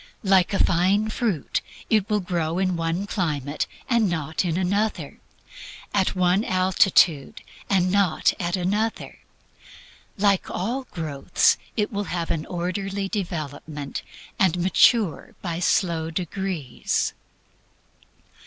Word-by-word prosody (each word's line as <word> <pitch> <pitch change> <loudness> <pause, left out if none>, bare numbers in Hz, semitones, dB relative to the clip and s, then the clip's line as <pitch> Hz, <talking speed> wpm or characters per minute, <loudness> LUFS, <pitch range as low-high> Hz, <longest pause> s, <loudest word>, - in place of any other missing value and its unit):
Like 190 -3 +4
a 200 - +1
fine 190 +5 +2
fruit, 215 - -1 0.3
it 215 -3 +2
will 210 -1 +1
grow 170 -2 -2
in 185 -1 +1
one 165 +3 -1
climate, 150 -7 -2 0.2
and 235 -5 +2
not 160 -1 -1
in 170 -2 -1
another; 200 +4 -1 0.7
at 195 -2 +1
one 185 +2 +3
altitude, 185 - +3 0.3
and 185 -2 +2
not 195 -5 +2
at 175 0 0
another. 205 +5 -2 1.0
Like 200 -1 +2
all 245 +8 -2
growth 155 - +1 0.2
it 210 -1 0
will 205 0 -2
have 170 -2 -3
an 160 -2 -2
orderly 195 +3 -3
development 155 -7 -4 0.4
and 185 -2 +3
mature 190 +2 +3
by 170 -2 -3
slow 170 -3 +1
degrees. 175 -4 -2
185 Hz, 115 wpm, -24 LUFS, 165-200 Hz, 1.0 s, Like